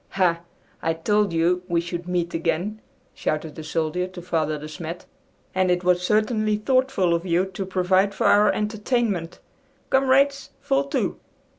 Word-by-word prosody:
"Ha! 175 Hz, -3 st, +3 dB, 0.4 s
I 165 Hz, -, +1 dB
told 205 Hz, +4 st, +1 dB
you 170 Hz, +2 st, +2 dB
we 170 Hz, -1 st, +1 dB
should 175 Hz, +1 st, -5 dB
meet 175 Hz, -1 st, -1 dB
again!" 170 Hz, +6 st, -1 dB, 0.3 s
shouted 155 Hz, 0 st, -2 dB
the 160 Hz, -, -8 dB
soldier 160 Hz, +3 st, -1 dB
to 185 Hz, -1 st, -10 dB
Father 160 Hz, -3 st, -1 dB
De 150 Hz, +1 st, -8 dB
Smet. 165 Hz, +2 st, -7 dB, 0.5 s
"And 185 Hz, 0 st, +2 dB
it 180 Hz, 0 st, +1 dB
was 180 Hz, 0 st, +3 dB
certainly 215 Hz, +2 st, +1 dB
thoughtful 255 Hz, -5 st, +1 dB
of 170 Hz, 0 st, 0 dB
you 180 Hz, 0 st, +1 dB
to 190 Hz, +1 st, -4 dB
provide 190 Hz, +2 st, +2 dB
for 230 Hz, -, -1 dB
our 205 Hz, +1 st, +5 dB
entertainment. 210 Hz, -4 st, -1 dB, 0.5 s
Comrades, 275 Hz, +1 st, +3 dB
fall 275 Hz, 0 st, +1 dB
to!" 280 Hz, -, -2 dB
180 Hz, 155 wpm, -24 LUFS, 170-215 Hz, 0.5 s, our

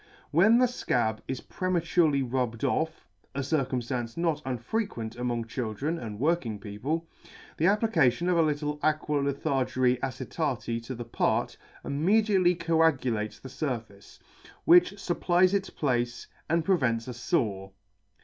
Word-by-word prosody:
When 205 Hz, +9 st, +5 dB
the 250 Hz, -, +5 dB
fcab 120 Hz, -, 0 dB
is 130 Hz, -1 st, -3 dB
prematurely 170 Hz, -5 st, +1 dB
rubbed 125 Hz, -2 st, -2 dB
off, 160 Hz, +4 st, -1 dB, 0.3 s
(a 140 Hz, -, -1 dB
circumftance 125 Hz, -4 st, -2 dB
not 165 Hz, -3 st, 0 dB
unfrequent 125 Hz, -, -3 dB
among 120 Hz, -1 st, -2 dB
children 125 Hz, +7 st, -3 dB
and 105 Hz, -3 st, -7 dB
working 140 Hz, -7 st, 0 dB
people,) 130 Hz, +12 st, -4 dB, 0.5 s
the 160 Hz, -, +1 dB
applica 200 Hz, -, +4 dB
tion 170 Hz, +8 st, -4 dB
of 180 Hz, -, +3 dB
a 170 Hz, -, +4 dB
little 150 Hz, -1 st, -1 dB
Aqua 155 Hz, -1 st, +1 dB
Lythargyri 135 Hz, -3 st, +1 dB
Acet. 125 Hz, -2 st, -3 dB
to 130 Hz, -, -5 dB
the 120 Hz, 0 st, -6 dB
part, 115 Hz, -, 0 dB, 0.3 s
immediately 185 Hz, +4 st, +3 dB
coagulates 160 Hz, -10 st, +1 dB
the 130 Hz, -, -10 dB
furface, 120 Hz, -8 st, -5 dB, 0.5 s
which 345 Hz, -, +6 dB
fupplies 185 Hz, -1 st, +2 dB
its 195 Hz, -1 st, 0 dB
place, 120 Hz, -3 st, -1 dB, 0.2 s
and 165 Hz, 0 st, +1 dB
prevents 130 Hz, -11 st, +1 dB
a 125 Hz, -, -4 dB
fore. 105 Hz, -, -1 dB
140 Hz, 130 wpm, -28 LUFS, 120-170 Hz, 0.5 s, which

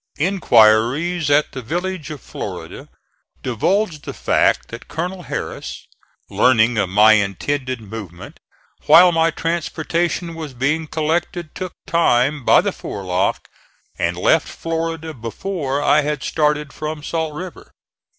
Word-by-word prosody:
Inquiries 145 Hz, -, +3 dB
at 145 Hz, +1 st, +3 dB
the 130 Hz, -, -6 dB
village 175 Hz, +6 st, -3 dB
of 150 Hz, -5 st, -7 dB
Florida -, -, -7 dB, 0.5 s
divulged 155 Hz, -, 0 dB
the -, -, -7 dB
fact -, -, +1 dB
that 115 Hz, +1 st, -9 dB
Colonel 180 Hz, +3 st, -4 dB
Harris, -, -, -6 dB, 0.4 s
learning 115 Hz, -2 st, +3 dB
of 95 Hz, -, 0 dB
my 105 Hz, +3 st, +6 dB
intended 125 Hz, +6 st, -1 dB
movement, 100 Hz, -5 st, -9 dB, 0.5 s
while 175 Hz, +4 st, +8 dB
my 165 Hz, 0 st, +3 dB
transportation 170 Hz, +1 st, -2 dB
was 155 Hz, -5 st, -7 dB
being 150 Hz, +6 st, 0 dB
collected 165 Hz, +2 st, -2 dB
took 185 Hz, -2 st, -6 dB
time 145 Hz, -3 st, +2 dB
by -, -, +6 dB
the -, -, -1 dB
forelock 95 Hz, -1 st, -2 dB, 0.5 s
and -, -, 0 dB
left -, -, +3 dB
Florida 165 Hz, -1 st, -4 dB
before 140 Hz, -, -3 dB
I 150 Hz, +1 st, +4 dB
had 150 Hz, -1 st, -3 dB
started 150 Hz, -2 st, 0 dB
from 155 Hz, -1 st, -5 dB
Salt 160 Hz, -2 st, -3 dB
River. 180 Hz, +2 st, -8 dB
150 Hz, 125 wpm, -20 LUFS, 120-165 Hz, 0.5 s, while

